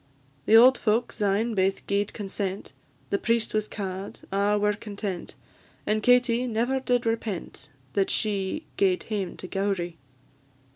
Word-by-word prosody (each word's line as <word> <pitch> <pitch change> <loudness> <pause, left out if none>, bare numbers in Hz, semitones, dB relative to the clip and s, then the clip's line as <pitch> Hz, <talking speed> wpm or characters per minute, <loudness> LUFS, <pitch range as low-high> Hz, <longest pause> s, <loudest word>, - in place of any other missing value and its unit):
The 220 - +6
auld 250 +2 +7
folk 225 +2 +1
syne 210 +3 0
baith 195 -1 0
gi'ed 200 0 0
consent; 195 -1 -4 0.4
The 200 - +1
priest 230 0 0
was 215 0 0
ca'd: 195 -1 -6
a' 200 +1 +2
were 210 0 +2
content; 205 -3 -6 0.5
And 215 0 +1
Katie 245 +1 +3
never 240 +3 0
did 245 -2 0
repent 220 -9 -3 0.2
That 195 -1 +1
she 205 +7 -1
gaed 185 -2 +2
hame 200 -5 -3
to 185 - -6
Gowrie. 190 -3 -2
205 Hz, 140 wpm, -26 LUFS, 195-230 Hz, 0.5 s, auld